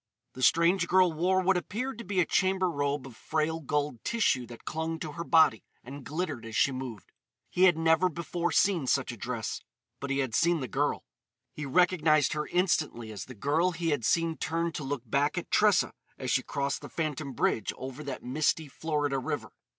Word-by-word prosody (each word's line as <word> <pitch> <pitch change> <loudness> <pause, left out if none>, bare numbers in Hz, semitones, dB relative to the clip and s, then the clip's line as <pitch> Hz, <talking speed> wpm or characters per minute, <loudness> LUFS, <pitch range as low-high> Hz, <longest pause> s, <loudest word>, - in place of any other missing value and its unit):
The 130 - -9
strange 170 +6 +4
girl 185 -2 +4
wore 185 +4 +2
what 185 0 +3
appeared 250 +8 -4
to - - -5
be 200 -4 -1
a 175 - +4
chamber 190 0 +1
robe 145 -2 -1
of 130 -4 -11
frail 160 +4 -1
gold 145 -5 -2
tissue 135 - +1
that 120 0 -12
clung 160 +1 -3
to 155 -1 -6
her 170 +3 -5
body 160 -10 +4 0.2
and 135 +3 -9
glittered 155 -5 -3
as 115 -1 -7
she 140 - +3
moved. 130 -6 -7 0.4
He 185 - +4
had 175 -3 +5
never 165 +2 +3
before 170 +1 -3
seen 170 -4 +2
such 135 0 +1
a - - -7
dress; 115 +1 -4 0.4
but 140 - -5
he 140 - 0
had 130 -5 -1
seen 170 +6 +3
the 130 - -4
girl; - - -1 0.5
he 150 -1 -5
recognised 155 -2 +3
her 150 0 -2
instantly 155 - 0
as 105 - -6
the 125 - -11
girl 160 - +1
he 165 0 -2
had 145 -6 0
seen 165 +5 +1
turn 165 +1 -1
to 150 - -5
look 135 -3 -3
back 140 +7 +1
at 175 - -4
Tressa 210 -3 +4 0.2
as 130 -2 -3
she 130 - +3
crossed 140 +1 -2
the - - -9
phantom 150 -3 -3
bridge 110 -3 0
over 130 +3 -7
that 140 -3 -6
misty 150 +4 0
Florida 145 -1 -1
river. 130 - -4
155 Hz, 200 wpm, -29 LUFS, 135-170 Hz, 0.5 s, had